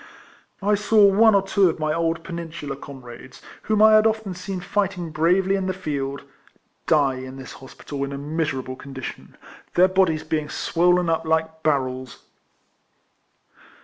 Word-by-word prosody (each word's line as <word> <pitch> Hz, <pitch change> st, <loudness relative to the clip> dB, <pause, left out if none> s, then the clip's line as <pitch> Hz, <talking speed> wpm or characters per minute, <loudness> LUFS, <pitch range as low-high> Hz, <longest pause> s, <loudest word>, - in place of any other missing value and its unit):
I 210 Hz, +1 st, +2 dB
saw 210 Hz, 0 st, +4 dB
one 210 Hz, +2 st, +5 dB
or 195 Hz, -, +3 dB
two 195 Hz, -1 st, +3 dB
of 160 Hz, -, -3 dB
my 155 Hz, -1 st, -1 dB
old 165 Hz, 0 st, -1 dB
Peninsular 165 Hz, -5 st, -6 dB
comrades, 130 Hz, -2 st, -11 dB, 0.2 s
whom 215 Hz, -1 st, +2 dB
I 220 Hz, 0 st, +7 dB
had 215 Hz, +1 st, +6 dB
often 220 Hz, -3 st, -2 dB
seen 185 Hz, +1 st, -5 dB
fighting 180 Hz, -2 st, -2 dB
bravely 180 Hz, +5 st, +2 dB
in 190 Hz, -1 st, -2 dB
the 185 Hz, -, -2 dB
field, 140 Hz, -6 st, -4 dB, 0.6 s
die 140 Hz, -4 st, +3 dB
in 130 Hz, 0 st, -8 dB
this 130 Hz, -1 st, -9 dB
hospital 140 Hz, +1 st, -7 dB
in 140 Hz, -, -4 dB
a 140 Hz, -, -5 dB
miserable 145 Hz, -3 st, -3 dB
condition, 135 Hz, -1 st, -9 dB, 0.4 s
their 180 Hz, +1 st, +6 dB
bodies 185 Hz, -4 st, +1 dB
being 155 Hz, -1 st, -2 dB
swollen 180 Hz, +2 st, +1 dB
up 165 Hz, 0 st, 0 dB
like 160 Hz, 0 st, -1 dB
barrels. 130 Hz, -4 st, -2 dB
165 Hz, 150 wpm, -23 LUFS, 140-190 Hz, 0.6 s, I